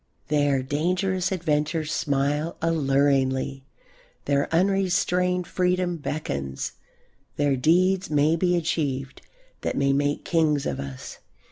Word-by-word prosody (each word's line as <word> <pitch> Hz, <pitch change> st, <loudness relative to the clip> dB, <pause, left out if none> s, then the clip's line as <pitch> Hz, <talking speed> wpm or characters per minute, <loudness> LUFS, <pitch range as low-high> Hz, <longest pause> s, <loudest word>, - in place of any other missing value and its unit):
There 145 Hz, -3 st, +2 dB
dangerous 180 Hz, +6 st, 0 dB
adventures 155 Hz, -2 st, -1 dB
smile 145 Hz, +3 st, -1 dB
alluringly; 135 Hz, -3 st, +1 dB, 0.6 s
there 140 Hz, 0 st, 0 dB
unrestrained 180 Hz, 0 st, +1 dB
freedom 180 Hz, -1 st, 0 dB
beckons; 70 Hz, -, -4 dB, 0.6 s
there 145 Hz, -1 st, +2 dB
deeds 180 Hz, +7 st, +2 dB
may 150 Hz, +1 st, +3 dB
be 180 Hz, +1 st, +1 dB
achieved 140 Hz, -5 st, -2 dB, 0.4 s
that -, -, -2 dB
may 140 Hz, 0 st, +2 dB
make 145 Hz, +1 st, 0 dB
kings 155 Hz, -4 st, +1 dB
of 70 Hz, -, -2 dB
us. 70 Hz, -2 st, -7 dB
150 Hz, 105 wpm, -25 LUFS, 140-180 Hz, 0.6 s, may